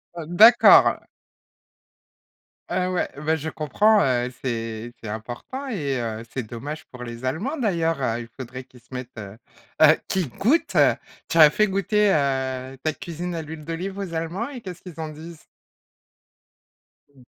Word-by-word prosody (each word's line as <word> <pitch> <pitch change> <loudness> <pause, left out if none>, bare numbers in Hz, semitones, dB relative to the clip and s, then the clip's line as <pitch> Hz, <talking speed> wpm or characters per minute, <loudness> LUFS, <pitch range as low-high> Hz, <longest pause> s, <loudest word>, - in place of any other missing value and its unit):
Heu, 165 -2 -6
d'accord. 220 +8 +7 1.7
Ah 185 +1 0
ouais, 180 - -1
bah 155 +2 0
je 160 +1 -4
comprends, 205 +9 +3
heu, 125 -1 +1
c'est 115 -1 -4
c'est 105 - -5
important 120 - -6
et 145 - -2
heu, 115 -1 -4
c'est 130 - -2
dommage 145 +7 -7
pour 125 -1 -10
les 120 +1 -7
Allemands 210 - -2
d'ailleurs, 165 - 0
heu, 120 -1 -1
il 115 - -10
faudrait 130 0 -7
qu'ils 125 -1 -19
se 125 +3 -20
mettent, 125 -2 -7
heu 100 +1 -9 0.4
heu, - - +8
qu'ils 180 -8 -1
goûtent. 255 - +1 0.6
Tu 165 - -2
leur 155 -2 +10
as - - +2
fait 215 +7 +2
goûter, 200 +2 +2
heu, 130 -2 -1
ta 155 -1 -1
cuisine 170 +1 -6
à 165 - -3
l'huile 155 0 -9
d'olive 180 +4 -4
aux 190 -4 -5
allemands 165 +8 -3
et 260 -4 -8
qu'est-ce 180 -4 -8
qu'ils 175 -4 -11
en 155 -1 -4
disent? 160 +1 -11 1.7
Mmh. 135 -3 -21
155 Hz, 165 wpm, -24 LUFS, 125-180 Hz, 1.7 s, leur